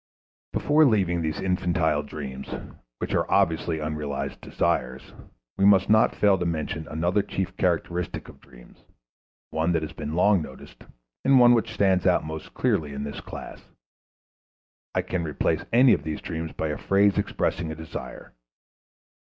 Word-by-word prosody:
Before 150 +2 +3
leaving 95 - +2
these 80 -1 -2
infantile 90 -5 +1
dreams, 70 -3 -7 0.5
which - - -4
are - - 0
obviously 85 -3 +2
unrealized 75 -3 -4
desires, 65 +1 -2 0.5
we 95 - +4
must 100 0 +5
not 110 0 +4
fail 100 -3 +3
to 90 - -1
mention 80 -1 -3
another 85 +6 0
chief 95 -1 -4
characteristic 90 0 -1
of - - -14
dreams, - - -18 0.7
one 80 +2 0
that 80 -2 0
has 80 +1 -6
been 75 0 -5
long 95 +1 +4
noticed, 65 -3 -11 0.4
and 135 -1 +5
one 120 0 +7
which 115 - 0
stands 95 -3 +2
out - - +3
most 80 0 -7
clearly 75 -3 0
in 70 0 -4
this 70 - -6
class. - - -9 1.3
I - - +1
can 90 -2 -2
replace 75 -2 -1
any 125 +1 +6
of - - +1
these 80 -1 -4
dreams 80 -1 -5
by 80 - -3
a 75 - -3
phrase 100 +1 +3
expressing 85 -4 -1
a - - -5
desire. 80 -5 -8
80 Hz, 155 wpm, -25 LUFS, 75-95 Hz, 1.3 s, one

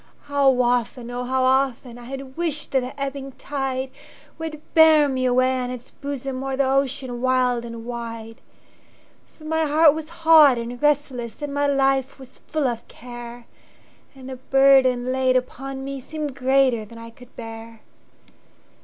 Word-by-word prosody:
How 275 -3 +2
often, 245 0 -1
oh 245 0 -4
how 260 +1 0
often,I 255 -2 0
had 265 +1 -8
wished 325 -3 -3
that 265 - +3
the 255 +2 -7
ebbing 275 -1 -4
tideWould 270 +4 -6
bear 315 -2 +6
me 260 -2 -1
away 255 +1 +2
on 250 -1 -3
its 250 -1 -8
bosomO'er 270 -1 -5
the 275 -1 +2
ocean 265 -2 -1
wild 250 -2 +1
and 230 -1 -8
wide! 230 -1 -7 0.9
For 310 - -20
my 320 +1 0
heart 305 0 +5
was 315 0 -6 0.2
hot 305 -6 +7
and 235 +1 -6
restless, 275 -5 0
And 290 -1 -4
my 285 0 +1
life 270 -1 +1
was 265 -2 -13
full 310 -3 -3
of 235 -2 -4
care, 240 0 -10 0.7
And 260 -1 -11
the 260 -1 -7
burden 260 -1 +4
laid 260 0 +1
upon 270 +1 -5
meSeemed 275 +2 -5
greater 260 -3 +2
than 230 +2 -13
I 230 0 -10
could 250 +2 -18
bear. 225 -1 -9
260 Hz, 150 wpm, -22 LUFS, 245-275 Hz, 0.9 s, hot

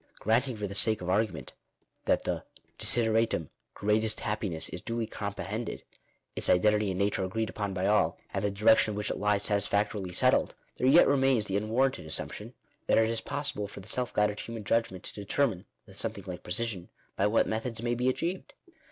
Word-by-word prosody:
Granting 120 +3 +1
for 105 - -3
the 100 - -5
sake 110 +2 +4
of 90 0 -2
ar 105 +4 +4
gument, 85 - -8 0.6
that - - +2
the - - -2 0.4
desideratum, 115 -7 +1 0.3
"greatest 105 +1 +1
happiness/' 105 -6 -2
is 90 - -3
duly 115 -1 -2
comprehended, 105 +2 -5 0.5
its - - +2
identity 105 +3 +4
and 95 - -2
nature 100 0 +1
agreed 110 +4 -2
upon 100 -2 -3
by 95 0 -1
all, 105 +1 +3 0.2
and - - -1
the 105 - +2
direction 105 +2 +4
in - - -5
which 105 0 -2
it - - -3
lies 105 0 +1
satisfactorily 100 -2 0
settled, - - +2 0.2
there 130 - +1
yet 150 +6 +7
1 - - +3
remains 135 -5 +3
the 95 - -3
unwarranted 115 -2 0
assumption 80 - -3 0.3
that - - +4
it 110 0 +4
is 115 - 0
possible 140 -8 -2
for 100 - -10
the 95 - -13
self 125 +1 -1
guided 105 0 +1
human 115 -2 -6
judgment 115 -3 0
to - - -7
determine, 105 -1 -1 0.2
with - - -13
something - - -2
like 90 -1 -6
precision, 95 -1 -2 0.3
by 100 - +2
what 110 +2 +3
methods 110 +1 -2
it - - -8
may 120 0 +1
be 125 +2 +1
achieved. 170 +8 -3
105 Hz, 195 wpm, -29 LUFS, 100-115 Hz, 0.6 s, yet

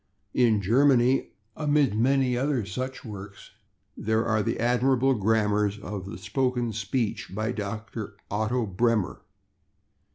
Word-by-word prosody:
In 110 -5 +3
Germany, 130 +3 +4 0.3
amid 145 -6 +2
many 130 +2 +2
other 130 -3 0
such 130 +8 -5
works, 100 -2 -9 0.4
there 110 +1 0
are 110 -1 +2
the - - -2
admirable 125 +2 +3
grammars 105 -2 +1
of 100 -2 -6
the 85 - -7
spoken 125 +3 -1
speech 110 0 -2
by 110 +3 -1
Dr. 110 -1 -5 0.2
Otto 110 +4 0
Bremer. 105 0 0
115 Hz, 120 wpm, -26 LUFS, 105-125 Hz, 0.4 s, Germany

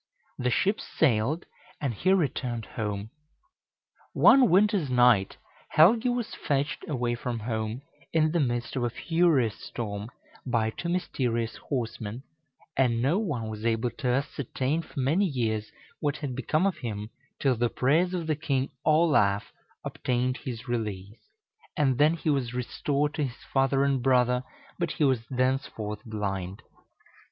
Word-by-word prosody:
The 125 - +1
ships 200 - +1
sailed, 140 +3 +2 0.3
and 140 -5 -1
he 185 - +1
returned 125 - 0
home. 105 -1 -4 1.0
One 265 -3 +6
winter's 195 - +3
night 120 -6 +4 0.4
Helgi 225 +10 +6
was 245 -2 -2
fetched 145 +1 -1
away 125 -4 0
from 120 0 -3
home, 110 +2 -3 0.3
in 155 -1 +3
the 170 - +1
midst 120 -4 -1
of 130 - 0
a 120 - +1
furious 155 - +1
storm, 105 -2 -5 0.3
by 115 -3 0
two 170 - -5
mysterious 120 -10 -1
horsemen, 115 -2 -4 0.5
and 125 -3 +2
no 140 - +2
one 145 - -2
was 110 0 -6
able 115 +1 +1
to 125 +3 -4
ascertain 135 +3 -1
for 160 - -8
many 155 +10 +2
years 110 - -1 0.3
what 145 0 -1
had 140 -4 -4
become 155 +7 +1
of 195 - 0
him, 105 -2 -5 0.3
till 135 -3 +2
the 120 +1 +1
prayers 165 +10 +2
of 170 -2 -3
the 155 -1 0
king, 140 -3 -1
Olaf, 150 -11 +3 0.3
obtained 125 +1 -1
his 120 -5 -7
release, 105 -3 -4 0.6
and 135 -3 +2
then 155 +3 +5
he 160 -2 0
was 125 -4 -1
restored 145 +4 -1
to 150 -3 0
his 125 -2 -8
father 135 0 +3
and 140 -2 +1
brother, 125 -1 +3 0.4
but 170 -2 -1
he - - -1
was 130 -4 +3
thenceforth 130 -5 -1
blind. 100 -3 -4
130 Hz, 145 wpm, -27 LUFS, 115-150 Hz, 1.0 s, One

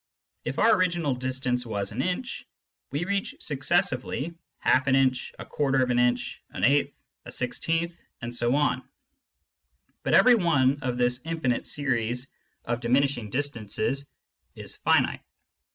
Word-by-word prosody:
If - - -3
our 230 - +5
original 175 -6 +1
distance 125 0 -1
was 100 -4 -3
an 120 - -2
inch, 185 - -3 0.4
we 145 +5 -2
reach 200 0 -1
successively 150 0 0 0.2
half 130 +1 +2
an 135 - +4
inch, 130 -2 +2
a - - -8
quarter 135 -2 +1
of 125 - 0
an 120 - +2
inch, 125 0 +1
an - - -6
eighth, 140 +2 +3 0.3
a - - -9
sixteenth, 165 +7 -2 0.2
and 120 0 -5
so 120 +2 +1
on; 135 -3 +2 1.2
but - - +2
every 250 - +7
one 145 - +3
of 125 -2 -2
this 125 0 +1
infinite 160 -7 -1
series 125 -3 -1 0.4
of 120 0 -1
diminishing 125 -2 +1
distances 135 +1 -2 0.5
is - - -6
finite. - - +2
130 Hz, 140 wpm, -27 LUFS, 125-155 Hz, 1.2 s, every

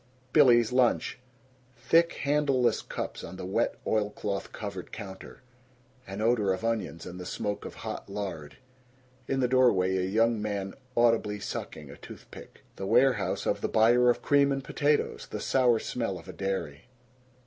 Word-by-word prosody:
Billy's 120 -3 +6
Lunch. 125 -1 +1 0.6
Thick 165 +7 +3
handleless 140 -4 +2
cups - - -6
on 90 - -8
the 90 - -7
wet 95 - 0
oilcloth 105 -2 -2
covered 100 -4 -7
counter. 95 +4 -9 0.6
An 95 +2 -5
odor 110 -3 +2
of 95 +5 -5
onions 110 -8 -2
and 90 +1 -8
the 90 - -7
smoke 105 0 -3
of - - -8
hot - - -7
lard. 95 -8 -6 0.7
In 135 0 0
the 125 - +3
doorway 100 -8 +3
a - - 0
young 110 +4 +1
man 100 -2 -3 0.2
audibly 115 -3 +2
sucking 75 -6 -6
a - - -12
toothpick. - - -13 0.2
The 95 - -4
warehouse 115 -5 +2
of - - 0
the - - -1
buyer 120 +3 +4
of 120 - +1
cream 140 -1 +4
and 135 0 -2
potatoes. 145 +2 0
The - - -5
sour 125 -3 +3
smell 110 -4 -3
of 85 - -13
a 95 - -8
dairy. 85 -7 -4
110 Hz, 160 wpm, -28 LUFS, 95-125 Hz, 0.7 s, Billy's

